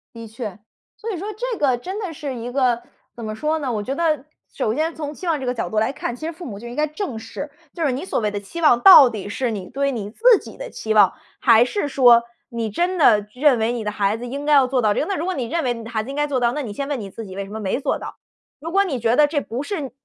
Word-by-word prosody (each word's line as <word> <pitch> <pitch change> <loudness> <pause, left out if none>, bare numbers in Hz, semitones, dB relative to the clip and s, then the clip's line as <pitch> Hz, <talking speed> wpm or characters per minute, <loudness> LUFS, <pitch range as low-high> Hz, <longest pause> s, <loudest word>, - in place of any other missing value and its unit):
的 230 0 -8
确。 220 -3 -7 0.4
所 455 +1 -5
以 380 - -4
说 385 +5 -5
这 480 +2 -3
个 265 -4 +2
真 375 - -6
的 380 -6 -4
是 285 -3 -5
一 240 +1 -6
个 250 -3 +1 0.3
怎 235 - -8
么 215 0 -4
说 305 +7 -1
呢？ 275 -4 -2
我 210 -3 -2
觉 260 - -3
得 305 -3 0 0.3
首 220 -5 -1
先 315 +5 -1
从 295 -2 -5
期 360 - -8
望 320 -3 +1
这 265 - -5
个 250 - 0
角 240 - -3
度 215 - 0
来 220 +4 +1
看， 240 - -4
其 310 - -8
实 325 - -2
父 340 +2 -10
母 200 -6 -7
就 235 - -9
应 240 - -8
该 300 +2 +1
正 305 - -5
视。 285 +6 -7 0.2
就 335 - -3
是 280 - +2
你 260 +5 -3
所 - - -1
谓 210 -2 -1
的 205 - -3
期 205 +12 -8
望 300 -7 +5
到 330 -9 +10
底 205 -3 -6
是 245 +3 -1
你 190 -4 -5
对 275 0 0
你 215 -5 -4
自 455 - +5
己 - - -12
的 - - -7
期 220 - -3
望， 205 -3 +6 0.3
还 230 -2 +6
是 295 +6 -2
说， 245 -4 +6 0.3
你 230 -2 -3
真 350 - -1
的 215 -10 +4
认 260 -1 +3
为 220 +1 +1
你 235 -2 -3
的 210 - -2
孩 205 +1 0
子 240 - -7
应 280 +4 -5
该 300 - +3
要 275 -2 +6
做 255 0 0
到 215 -2 +3
这 - - -1
个。 - - -1
那 395 - -2
如 330 - -3
果 375 - -1
你 255 - -2
认 330 +8 -2
为 250 -2 +1
你 230 -1 -8
的 225 - -9
孩 220 -2 -1
子 240 - -10
应 275 - -5
该 295 - +1
要 - - 0
做 275 -3 0
到， 240 -1 +2
那 295 - -2
你 225 -7 -5
先 275 +6 -4
问 285 -3 -2
你 200 -3 -6
自 225 - -8
己 190 -2 -9
为 200 - -3
什 195 - -12
么 220 - -5
没 205 +3 -1
做 285 - -1
到？ - - -8 0.4
如 325 +4 -6
果 395 +2 +4
你 295 -10 -3
觉 230 +1 +2
得 300 +1 +5
这 290 0 0
不 250 -2 -5
是 295 -4 -4
255 Hz, 340 characters per minute, -21 LUFS, 225-305 Hz, 0.4 s, 到